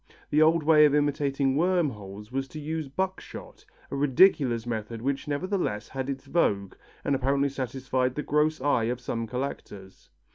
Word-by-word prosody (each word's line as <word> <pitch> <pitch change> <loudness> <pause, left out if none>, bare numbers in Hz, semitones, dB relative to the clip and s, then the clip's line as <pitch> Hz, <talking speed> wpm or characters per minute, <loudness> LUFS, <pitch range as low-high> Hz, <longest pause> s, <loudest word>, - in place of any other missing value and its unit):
The 150 - +4
old 160 +1 +4
way 150 0 +6
of 145 -1 +3
imitating 140 -2 +1
worm 175 -1 +2
holes 105 0 -10
was 135 +1 -2
to 155 - -8
use 155 0 -4
buckshot, 190 +7 -5 0.3
a - - -2
ridiculous 135 -4 +3
method 115 -1 -4
which 140 +1 -2
nevertheless 145 - -2
had 135 0 -4
its 135 -1 -5
vogue 100 - 0 0.3
and 140 - 0
apparently 140 +1 +1
satisfied 130 -1 -2
the 150 - -3
gross 150 +1 +1
eye 130 -5 +2
of 120 +1 -2
some 115 -2 -4
collectors. 105 -6 -6
135 Hz, 160 wpm, -27 LUFS, 125-150 Hz, 0.3 s, way